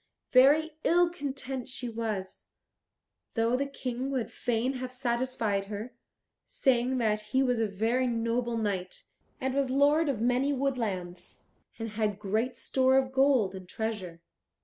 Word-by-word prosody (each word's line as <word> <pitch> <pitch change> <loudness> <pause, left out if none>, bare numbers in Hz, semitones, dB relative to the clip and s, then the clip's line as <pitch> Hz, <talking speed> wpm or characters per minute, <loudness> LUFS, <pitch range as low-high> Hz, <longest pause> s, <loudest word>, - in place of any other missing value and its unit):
Very 300 +5 +5
ill 345 0 +4
content 270 -5 -5
she 255 -1 -5
was, 220 -5 -4 0.9
though 230 +1 +2
the 280 +2 0
King 260 -1 -4
would 260 -4 -2
fain 245 +2 -1
have 255 -1 -4
satisfied 235 -5 -1
her, 210 +4 -6 0.5
saying 255 0 +1
that 215 -3 +1
he 230 +6 +1
was 250 -3 +1
a 225 - +2
very 225 +6 0
noble 235 0 0
knight, 195 -4 -3 0.4
and 265 0 -1
was 275 -1 +1
lord 290 +4 +3
of 260 -6 -1
many 250 +4 +2
woodlands, 225 -10 -3 0.3
and 225 -1 -4
had 210 -2 -1
great 220 +5 -1
store 260 +1 +2
of 260 -1 +1
gold 265 -7 +3
and 185 -2 -9
treasure. 190 -7 -4
245 Hz, 145 wpm, -29 LUFS, 220-265 Hz, 0.9 s, Very